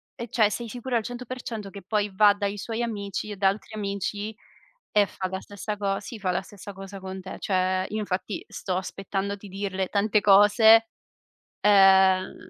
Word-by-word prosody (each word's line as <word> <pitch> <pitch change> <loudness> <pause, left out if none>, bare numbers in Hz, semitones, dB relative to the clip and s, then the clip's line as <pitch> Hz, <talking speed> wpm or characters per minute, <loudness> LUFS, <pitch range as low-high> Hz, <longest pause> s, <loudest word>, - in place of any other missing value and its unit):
e 235 -2 -7
cioè, 215 -2 +3
sei 230 +3 -4
sicuro 245 +1 -4
al 225 - -2
100% 245 -3 -6
che 200 - -9
poi 205 +1 -1
va 205 +1 +6
dai 205 0 -3
suoi 225 +3 -3
amici 210 -2 -4
e - - -5
da 195 0 +4
altri 215 +2 -6
amici 205 +1 -3 0.6
e 205 -1 +4
fa 185 - -4
la 190 0 -4
stessa 205 +1 -6
co 195 -1 -1
sì, 220 +2 -8
fa 185 -3 0
la 180 - -1
stessa 200 0 -11
cosa 195 +1 -9
con 190 0 -7
te. 185 - -8
Cioè, 185 -1 0
io, 215 - -3
infatti, 200 0 -3
sto 185 -2 -3
aspettando 195 +1 -3
di 205 +1 -12
dirle 190 -1 -3
tante 210 +1 +2
cose, 220 +3 +6 0.7
ehm, 190 -2 +5
200 Hz, 180 wpm, -26 LUFS, 195-215 Hz, 0.7 s, va